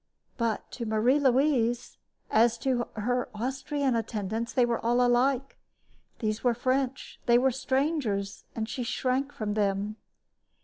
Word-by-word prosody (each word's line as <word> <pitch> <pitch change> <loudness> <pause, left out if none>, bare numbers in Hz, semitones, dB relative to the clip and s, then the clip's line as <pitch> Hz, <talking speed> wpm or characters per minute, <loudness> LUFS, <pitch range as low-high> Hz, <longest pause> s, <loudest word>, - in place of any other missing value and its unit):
But 230 -3 -2
to 235 -3 -5
Marie 225 +6 +3
Louise, 255 -3 +2 0.3
as 230 +1 +4
to 245 -1 0
her 245 +3 -1
Austrian 265 +3 -1
attendants, 225 0 -2
they 250 - +3
were 235 -1 -1
all 240 +2 +2
alike. 250 +2 +2 0.6
They 215 -3 0
were 245 -2 +2
French, 260 +2 -1
they 235 0 +6
were 260 +2 +3
strangers, 260 -7 -1
and 220 -1 -2
she 245 +3 -4
shrank 255 +3 -1
from 210 -5 -3
them. 205 0 0
240 Hz, 135 wpm, -28 LUFS, 220-265 Hz, 0.6 s, they